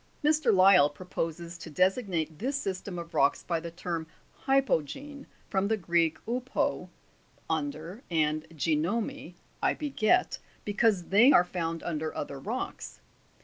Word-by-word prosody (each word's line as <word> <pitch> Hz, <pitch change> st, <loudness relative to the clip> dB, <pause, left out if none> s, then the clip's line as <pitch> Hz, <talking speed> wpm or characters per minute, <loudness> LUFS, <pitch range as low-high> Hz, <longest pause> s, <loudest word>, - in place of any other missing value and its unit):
* -, -, -35 dB
Mr. 305 Hz, -5 st, +4 dB
Lyell 185 Hz, -6 st, +6 dB
proposes 170 Hz, +1 st, -5 dB
to 165 Hz, -, -8 dB
designate 180 Hz, -, 0 dB
this 270 Hz, +5 st, -1 dB
system 195 Hz, -6 st, -4 dB
of 170 Hz, -1 st, -7 dB
rocks 140 Hz, -, +2 dB
by 170 Hz, -2 st, -1 dB
the 170 Hz, +1 st, -6 dB
term 165 Hz, -1 st, -4 dB, 0.4 s
Hypo'gene 275 Hz, -, 0 dB, 0.2 s
(from 190 Hz, 0 st, 0 dB
the 220 Hz, +1 st, +1 dB
Greek, 170 Hz, -3 st, +1 dB
vpo, 250 Hz, +2 st, -1 dB, 0.6 s
under, 160 Hz, -, -3 dB
and 155 Hz, -2 st, 0 dB
geinomai, 175 Hz, -, -1 dB, 0.3 s
I -, -, +2 dB
beget), 295 Hz, +3 st, +1 dB, 0.3 s
because 205 Hz, -3 st, +1 dB
they 225 Hz, +8 st, +7 dB
are 180 Hz, -, +6 dB
found 165 Hz, -2 st, -3 dB
under 155 Hz, -2 st, -3 dB
other 140 Hz, -1 st, -5 dB
rocks. -, -, -5 dB
180 Hz, 135 wpm, -29 LUFS, 160-225 Hz, 0.6 s, they